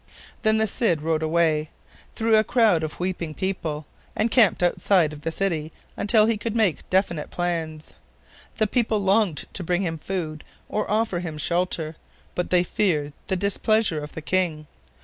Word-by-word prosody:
Then 220 Hz, -1 st, +3 dB
the 220 Hz, -, +3 dB
Cid 195 Hz, -, 0 dB
rode 160 Hz, 0 st, +1 dB
away, 160 Hz, -1 st, +1 dB, 0.5 s
through 225 Hz, -1 st, +3 dB
a 215 Hz, -, +5 dB
crowd 220 Hz, -9 st, +3 dB
of 155 Hz, -1 st, -5 dB
weeping 175 Hz, -3 st, -3 dB
people, 165 Hz, -6 st, -3 dB, 0.3 s
and 225 Hz, +1 st, +1 dB
camped 215 Hz, -7 st, +4 dB
outside 175 Hz, -2 st, +3 dB
of 150 Hz, -, -10 dB
the 165 Hz, -, -2 dB
city 160 Hz, -4 st, -1 dB, 0.2 s
until 215 Hz, +1 st, +3 dB
he 225 Hz, -1 st, +1 dB
could 225 Hz, +1 st, -4 dB
make 215 Hz, -8 st, +1 dB
definite 185 Hz, -5 st, +1 dB
plans. 165 Hz, -3 st, -3 dB, 0.7 s
The 220 Hz, -, +3 dB
people 220 Hz, -1 st, +1 dB
longed 195 Hz, -4 st, +2 dB
to 190 Hz, -, -4 dB
bring 180 Hz, +2 st, 0 dB
him 165 Hz, -3 st, -3 dB
food 155 Hz, -4 st, -4 dB, 0.2 s
or 210 Hz, -, -2 dB
offer 215 Hz, -4 st, +1 dB
him 165 Hz, -3 st, -5 dB
shelter, 165 Hz, -1 st, -1 dB, 0.4 s
but 180 Hz, -, -2 dB
they 180 Hz, -1 st, +4 dB
feared 155 Hz, -7 st, 0 dB
the 190 Hz, -, 0 dB
displeasure 200 Hz, -2 st, +1 dB
of 150 Hz, -, -8 dB
the 160 Hz, -, -7 dB
king. 165 Hz, -4 st, 0 dB
180 Hz, 170 wpm, -24 LUFS, 160-210 Hz, 0.7 s, a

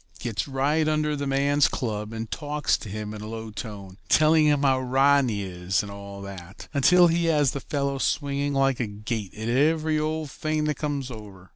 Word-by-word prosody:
Gets 115 Hz, -1 st, -3 dB
right 145 Hz, +3 st, +1 dB
under 155 Hz, -1 st, +1 dB
the 140 Hz, -1 st, -3 dB
man's 140 Hz, +1 st, +3 dB
club 105 Hz, -3 st, -3 dB
and 115 Hz, 0 st, -6 dB
talks 150 Hz, -1 st, 0 dB
to 110 Hz, -, -7 dB
him 105 Hz, +1 st, -5 dB
in 105 Hz, -, -7 dB
a 105 Hz, -, -6 dB
low 110 Hz, 0 st, -6 dB
tone, 100 Hz, -2 st, -8 dB
telling 155 Hz, 0 st, +5 dB
him 145 Hz, -1 st, +2 dB
how 135 Hz, -2 st, +3 dB
rotten 135 Hz, +1 st, +3 dB
he 100 Hz, -2 st, -2 dB
is 90 Hz, +1 st, -1 dB
and 100 Hz, -, -8 dB
all 100 Hz, 0 st, -9 dB
that, 95 Hz, 0 st, -10 dB
until 175 Hz, +6 st, +6 dB
he 170 Hz, 0 st, +2 dB
has 150 Hz, -5 st, +3 dB
the 140 Hz, -, -4 dB
fellow 140 Hz, 0 st, -2 dB
swinging 140 Hz, 0 st, -1 dB
like 135 Hz, -1 st, +2 dB
a 120 Hz, -, -1 dB
gate 105 Hz, 0 st, -5 dB
at 110 Hz, +1 st, -5 dB
every 155 Hz, +5 st, +2 dB
old 155 Hz, -1 st, -2 dB
thing 155 Hz, 0 st, -2 dB
that 150 Hz, -1 st, -1 dB
comes 140 Hz, -4 st, -3 dB
over. 100 Hz, -5 st, -11 dB
135 Hz, 205 wpm, -25 LUFS, 105-150 Hz, -, until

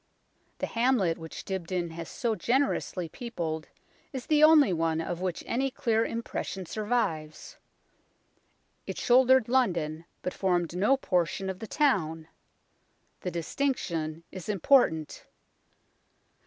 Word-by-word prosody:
The -, -, -2 dB
hamlet 230 Hz, -9 st, +1 dB
which 160 Hz, 0 st, -8 dB
Dibdin 180 Hz, -2 st, -3 dB
has 165 Hz, 0 st, -7 dB
so 235 Hz, -3 st, -1 dB
generously 230 Hz, -5 st, 0 dB
peopled 160 Hz, -6 st, -5 dB, 0.4 s
is 260 Hz, -3 st, -6 dB
the 305 Hz, -1 st, +3 dB
only 305 Hz, -, +7 dB
one 165 Hz, -1 st, 0 dB
of 170 Hz, +1 st, -3 dB
which 185 Hz, -3 st, -2 dB
any 270 Hz, +3 st, 0 dB
clear 225 Hz, -3 st, +1 dB
impression 215 Hz, -5 st, -4 dB
survives. 170 Hz, -8 st, -2 dB, 1.3 s
It -, -, -5 dB
shouldered 260 Hz, -1 st, +5 dB
London, 170 Hz, -11 st, 0 dB, 0.2 s
but 180 Hz, -, -2 dB
formed 175 Hz, -3 st, 0 dB
no 210 Hz, +9 st, +3 dB
portion 185 Hz, -3 st, 0 dB
of 185 Hz, -, -10 dB
the 225 Hz, -, -6 dB
town. 165 Hz, -, +1 dB, 0.9 s
The 180 Hz, -, -3 dB
distinction 170 Hz, -, -2 dB
is 185 Hz, +1 st, -8 dB
important. 195 Hz, -, +2 dB
185 Hz, 115 wpm, -28 LUFS, 165-245 Hz, 1.3 s, only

